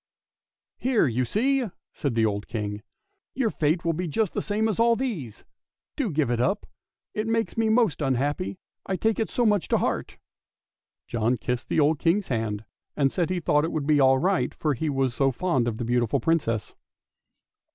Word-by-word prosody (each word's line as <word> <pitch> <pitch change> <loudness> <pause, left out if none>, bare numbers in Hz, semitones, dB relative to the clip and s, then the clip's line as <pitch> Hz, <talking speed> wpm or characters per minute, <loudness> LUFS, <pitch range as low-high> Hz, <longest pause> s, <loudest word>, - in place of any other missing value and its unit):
" - - -68
Here 250 -8 +4
you 125 -1 0
see," 250 - +1 0.2
said 140 -5 -2
the 115 -1 +3
old 105 -1 -2
King, 105 -2 -4 0.3
" 400 0 -52
your 245 -5 +1
fate~will 165 +2 +1
be 180 +3 -2
r - - -4
just 210 +5 0
the - - -1
same 215 +1 0
as 215 -2 -2
all 230 0 +5
these. 190 - -4 0.5
Do 275 -8 -1
give 150 -6 0
it 120 -1 +1
up. 195 - 0 0.5
It 215 +1 -2
makes 225 0 0
me 225 -1 +1
most 220 -8 +2
un 135 -3 +2
happy, 145 +9 -2 0.3
I 190 - -2
take 220 +4 0
it 225 - 0
so 240 - +1
much 210 -4 +2
to - - +2
heart." - - -2 0.9
John 120 +1 0
kissed 120 +2 -3
the - - +1
old 150 0 +3
King's 180 +4 +1
hand 110 -3 -2 0.3
and 140 -2 +3
said 175 -2 0
he 185 -1 0
thought 150 -3 +2
it 165 - -1
would 155 -3 -2
be 150 0 +3
all 135 -1 +5
right 185 +6 +1
for 150 -2 0
he 150 +5 -2
was 135 -3 0
so 135 +2 +2
fond 130 -3 0
of 115 -2 -2
the 120 - -3
beautiful 120 -1 +1
Princess. 150 -10 0
155 Hz, 205 wpm, -26 LUFS, -, 0.9 s, all